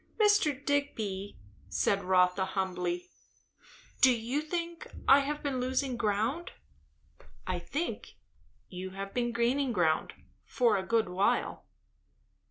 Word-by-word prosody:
"Mr. 365 -10 +3
Digby," 215 -9 -2 0.3
said 195 - +1
Rotha 180 0 +3
humbly, 180 -2 -2 0.9
"do 260 - +8
you 240 +5 -1
think 335 +1 -4 0.2
I 275 +1 +8
have 290 +2 -3
been 275 -3 -1
losing 260 +1 -1
ground?" 230 +9 -1 0.9
"I 185 -1 -2
think 295 - -4 0.5
you 185 0 -6
have 195 0 -5
been 240 -1 0
gaining 245 +3 +1
ground, 170 -7 +1 0.3
for 240 -3 +2
a 195 - +1
good 225 +1 +1
while." 185 +3 0
235 Hz, 115 wpm, -30 LUFS, 190-280 Hz, 0.9 s, do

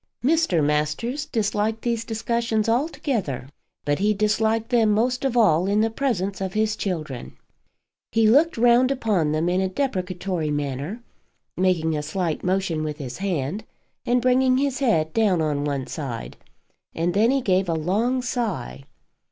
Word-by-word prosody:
Mr. 295 - +2
Masters 150 - -1
disliked 220 0 -1
these 235 -2 -1
discussions 225 -1 -1
altogether, 230 - -1 0.4
but 145 +2 0
he 210 +2 +2
disliked 220 +2 +1
them 230 -3 +4
most 245 +5 +1
of 260 -3 0
all 185 -6 +4
in 210 +2 +2
presence 200 -8 -1
of 190 -1 -3
his 215 0 +1
children. 155 - -5 0.7
He 225 -1 +3
looked 290 +8 +4
round 240 +2 +5
upon 210 - 0
them 155 +2 0
in 180 +1 +1
a 190 - 0
deprecatory 185 - -2
manner, 145 - -3 0.5
making 170 -4 +1
a 150 - -1
slight 170 0 -2
motion 185 -4 0
with 150 -1 -4
his 130 -2 -7
hand 185 0 -2 0.4
and 245 0 +1
bringing 255 0 +3
his 275 -1 0
head 160 - +1
down 205 -6 +2
on 150 -2 0
one 140 -3 -2
side, 130 -7 -6 0.6
and 170 +2 0
then 215 +4 +3
he 270 +1 +2
gave 190 -4 +1
a - - +1
long 220 +11 0
sigh. 195 - -3
200 Hz, 150 wpm, -23 LUFS, 160-235 Hz, 0.7 s, round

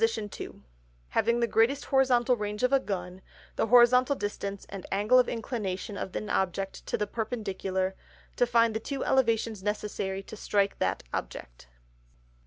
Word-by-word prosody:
_ 225 -2 -2 0.5
Having 235 - +2
the - - +4
greatest 230 +6 +2
Horizontal 255 -2 +3
Range 210 0 -4
of 250 +2 +3
a 275 - +6
Gun, 185 -5 -5 0.3
the - - 0
Horizontal 250 +3 +6
Distance 200 -3 -4
and 195 -2 -7
Angle 210 +6 +4
of 250 - +3
Inclination 210 -4 -4
of 190 - -5
an 215 - -3
Object 190 +1 -1
to - - 0
the 210 - 0
Perpendicular, 195 -4 -2 0.4
to 245 - +2
find 230 -1 +3
the - - 0
two 270 +4 -4
Elevations 230 -5 +1
necessary 200 -1 -3
to 220 - -10
strike 200 -1 0
that - - 0
Object. - - -6
215 Hz, 155 wpm, -28 LUFS, 195-240 Hz, 0.5 s, a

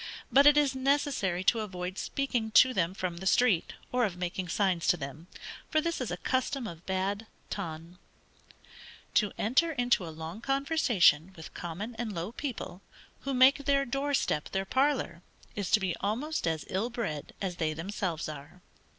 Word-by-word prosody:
But 280 +1 +7
it 295 0 +7
is 285 -3 +3
necessary 260 -9 0
to 230 +4 +3
avoid 185 -3 -4
speaking 250 -5 -1
to 255 +3 +7
them 185 -3 0
from 180 -3 -3
the 190 +2 -4
street, 215 -6 +3 0.2
or 250 0 +2
of 190 -6 -1
making 180 +1 -3
signs 185 -2 +1
to 175 - +4
them, 150 +3 -7 0.4
for 310 - +3
this 335 -2 -2
is 250 - -2
a 175 - -3
custom 260 +5 -1
of 170 -5 -9
bad 195 +3 -1 0.2
ton. 170 -1 -6 1.1
To 210 -2 +3
enter 315 +9 +2
into 245 -7 +2
a - - -5
long 160 +6 -7
conversation 255 - +3
with 160 -3 -10
common 185 +8 -5
and 225 -3 -3
low 170 +5 -3
people, 230 -9 -5 0.4
who 275 -1 -3
make 265 +2 +5
their 275 -1 +3
door 275 +2 0
step 150 - 0
their 195 0 -2
parlor, 260 -8 +1 0.3
is 200 -3 -3
to 225 - +5
be 185 -4 -1
almost 245 - -2
as 160 -2 -1
ill 200 +6 -1
bred 210 -12 -4
as 185 -3 -3
they 155 -2 -1
themselves 175 -1 -3
are. 155 +4 -10
200 Hz, 175 wpm, -30 LUFS, 175-260 Hz, 1.1 s, But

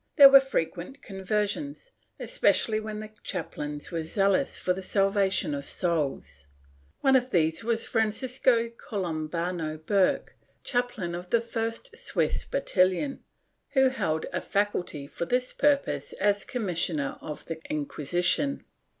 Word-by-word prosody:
There 280 -3 +11
were 275 0 +10
frequent 270 - -3
conversions, 210 - -3 0.3
especially 225 - +2
when 215 0 -5
the 215 0 -9
chaplains 150 -5 -5
were 165 -1 -2
zealous 195 +4 +1
for 180 - 0
the 190 - -6
salvation 195 -3 +2
of 140 0 -3
souls. 145 - -1 0.5
One 265 0 +5
of 255 0 +3
these 160 -1 +1
was 225 0 +1
Francisco 235 +1 +1
Columbano 170 -6 -3
Burke, 185 +4 +1 0.3
chaplain 245 -8 -1
of 175 +1 -6
the 235 - +4
first 230 - -4
Swiss - - -1
battalion, 195 +2 +1 0.5
who 265 -2 +5
held 160 -11 -1
a - - -1
faculty 190 -8 -1
for 155 - -5
this 250 +5 0
purpose 280 - +1
as 205 0 +1
commissioner 175 - -1
of 150 - -7
the 165 -1 -5
Inquisition. 175 - 0
195 Hz, 125 wpm, -27 LUFS, 165-245 Hz, 0.5 s, There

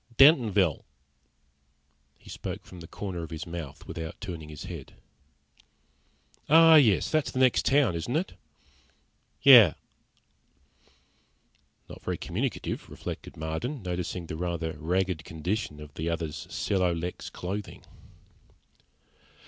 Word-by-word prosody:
"Dentonville." 110 - +5 1.3
He - - -22
spoke - - -6
from 90 - -12
the 85 - -10
corner 95 -2 -5
of 80 - -7
his 80 -1 -6
mouth, 80 -4 -7
without 80 0 -7
turning 85 -7 -7
his 75 -2 -8
head. - - -8 1.6
"Oh, 165 +2 +8
yes. 120 - +5
That's 155 -2 +1
the - - -7
next 130 -1 +3
town, 135 -5 +4
isn't 85 - -3
it?" 170 +4 -1 1.1
"Yeah." 120 - +9 2.1
Not - - -11
very - - -3
communicative, - - -3
reflected - - -8
Marden, 80 - -4
noticing 90 -1 -4
the 80 - -6
rather 85 -2 -3
ragged 90 +1 -1
condition 80 0 -4
of 75 -1 -11
the 80 +3 -3
other's 80 -2 -4
celo 90 -4 0
lex 90 +2 -5
clothing. 100 +4 -6
90 Hz, 115 wpm, -28 LUFS, 80-110 Hz, 2.1 s, Yeah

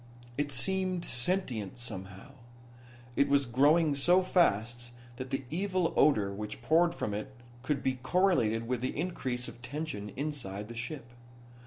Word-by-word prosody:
It 145 +1 -1
seemed 185 +6 +1
sentient, 125 - 0
somehow. 100 -1 -7 0.8
It 140 - +3
was 140 -1 +3
growing 145 +6 +4
so 175 +7 +4
fast 120 - +1 0.3
that 130 0 -6
the 135 +1 -2
evil 185 0 0
odor 105 -9 +3
which 105 +1 -6
poured 170 +2 +3
from 105 - -3
it 105 +6 -5 0.3
could 140 +1 -2
be 130 -1 0
correlated 125 - +2
with 125 -1 -1
the 130 - -3
increase 130 -7 -3
of 120 - -11
tension 130 -6 -5
inside 120 -9 -4
the 120 - -8
ship. 120 0 -6
130 Hz, 145 wpm, -31 LUFS, 115-160 Hz, 0.8 s, growing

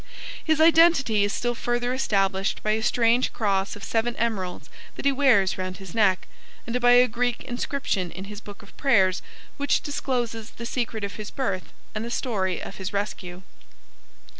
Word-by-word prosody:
His 315 -1 +2
identity 320 -9 +5
is 205 - +1
still 240 +2 -1
further 240 +1 -1
established 195 -6 0
by 215 - +1
a 220 +1 +1
strange 235 +2 +2
cross 195 -3 0
of 205 - -11
seven 235 +1 0
emeralds 200 -6 -2 0.3
that - - -7
he 280 - +5
wears 250 -10 +3
round 185 0 -4
his 190 -4 -10
neck, 190 -4 +2 0.4
and 245 +1 -2
by 245 0 +6
a 250 +1 +7
Greek 245 +1 -1
inscription 245 -7 -2
in 185 - -8
his 205 +1 -8
book 205 0 -11
of 200 - -17
prayers 190 -9 +3 0.4
which 285 0 +1
discloses 240 -6 -3
the 235 - -6
secret 235 -3 -2
of 200 - -4
his 215 -1 -6
birth 200 -9 -3 0.2
and 215 - -3
the 235 - -5
story 195 -7 -1
of - - -8
his 190 -1 -4
rescue. 190 -3 -4
225 Hz, 175 wpm, -25 LUFS, 195-245 Hz, 0.4 s, a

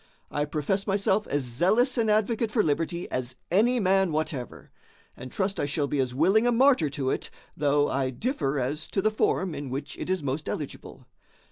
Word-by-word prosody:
I 145 0 0
profess 160 +7 -2
myself 200 +1 +1
as 145 -1 -1
zealous 190 - +2
an 230 -3 +1
advocate 220 +2 +1
for 215 0 +2
liberty 165 +3 -1
as 125 0 -3 0.2
any 235 +7 +3
man 195 -3 +3
whatever; 150 -5 -4 0.4
and 130 0 -9
trust 195 0 -1
I 145 - 0
shall 145 0 0
be 140 0 -2
as 125 -2 -1
willing 195 - +4
a - - +4
martyr 245 - +4
to 135 -1 -2
it, - - -3 0.3
though 145 0 +2
I 135 -1 0
differ 145 - -2
as 145 +5 -3
to 195 - -1
the 215 - +3
form 190 -4 0
in 145 -2 -5
which 140 +3 -5
it - - -5
is 185 -4 0
most 140 +3 -3
eligible. 145 -3 -6
160 Hz, 195 wpm, -27 LUFS, 140-210 Hz, 0.4 s, willing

